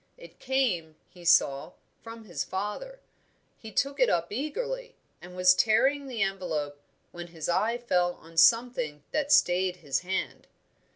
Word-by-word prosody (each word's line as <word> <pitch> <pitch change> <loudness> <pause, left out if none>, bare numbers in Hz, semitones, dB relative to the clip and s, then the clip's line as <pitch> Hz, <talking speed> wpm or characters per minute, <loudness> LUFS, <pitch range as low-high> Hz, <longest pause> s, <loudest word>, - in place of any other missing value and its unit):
It - - -15
came, 215 -13 -1
he 175 - -16
saw, 140 -4 +3 0.3
from 225 0 -10
his 170 -8 -4
father. 210 - -5 0.6
He 220 - -10
took 275 +3 -1
it 255 - +4
up 170 0 0
eagerly, 485 - -4 0.3
and 180 +1 -12
was 180 0 +5
tearing 270 +8 +2
the 235 -5 -1
envelope 155 -7 -3 0.3
when 175 0 -8
his 165 -2 -7
eye 220 +7 +1
fell 180 -7 0
on 165 +1 -17
something 195 - +3
that 295 -1 -1
stayed 180 -3 +3
his 145 -7 -2
hand. 190 +1 -4
190 Hz, 150 wpm, -28 LUFS, 175-255 Hz, 0.6 s, was